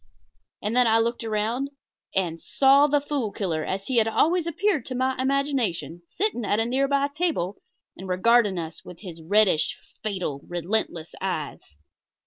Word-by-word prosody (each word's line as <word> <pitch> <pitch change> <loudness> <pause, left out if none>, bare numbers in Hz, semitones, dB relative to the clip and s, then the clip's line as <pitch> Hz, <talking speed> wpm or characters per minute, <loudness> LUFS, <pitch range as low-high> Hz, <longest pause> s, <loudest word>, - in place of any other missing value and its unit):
And 210 +3 -1
then 250 -1 +5
I 225 0 +5
looked 235 +1 0
around 225 +5 -1 0.5
and 170 -4 0
saw 275 +2 +5
the 290 0 +3
Fool 280 -6 -2
Killer, 165 -7 -2
as 195 +3 -3
he 255 +1 -1
had 225 -1 +4
always 330 +9 +2
appeared 355 -1 +1
to 255 - -4
my 260 +1 +1
imagination, 260 - -1
sitting 390 - -1
at 205 +1 +1
a 225 - +2
nearby 275 +3 +1
table, 285 - -2 0.3
and 190 +1 -9
regarding 205 +1 +3
us 160 -1 -6
with 180 - -12
his 170 -5 -9
reddish, 195 -1 +2 0.2
fatal, 185 -10 -3
relentless 175 -1 -2
eyes. 155 - -4
220 Hz, 155 wpm, -25 LUFS, 185-275 Hz, 0.5 s, then